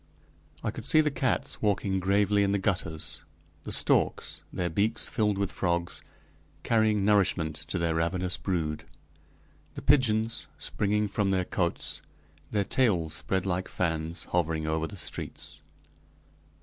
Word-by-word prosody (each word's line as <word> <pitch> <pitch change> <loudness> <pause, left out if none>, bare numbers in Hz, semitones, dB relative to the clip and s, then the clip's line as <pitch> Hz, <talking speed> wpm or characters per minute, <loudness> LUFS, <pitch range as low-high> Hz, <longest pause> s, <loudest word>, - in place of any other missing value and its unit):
I - - 0
could - - -8
see 155 - +5
the 150 -1 +3
cats 130 -2 -1
walking 100 -2 +1
gravely 100 +2 +3
in 100 0 +2
the - - +3
gutters; 90 -5 -2 0.4
the - - -4
storks, - - +3
their 90 - -1
beaks 105 +7 +1
filled 105 -4 +1
with 100 -1 -1
frogs, 85 -1 -1 0.6
carrying 110 -3 +2
nourishment 95 -7 +2
to - - -2
their 85 -1 0
ravenous 90 +2 0
brood; 80 -5 -2 0.9
the - - -6
pigeons, 115 -4 +2
springing 105 +1 0
from 100 0 0
their 95 -1 +1
cotes, 85 -2 -1 0.5
their 105 -1 +1
tails 95 -9 +1
spread 95 -1 0
like 95 0 -1
fans, 80 -1 -2
hovering 80 -3 0
over 80 +1 0
the 100 - -10
streets. - - -5
95 Hz, 135 wpm, -28 LUFS, 85-105 Hz, 0.9 s, see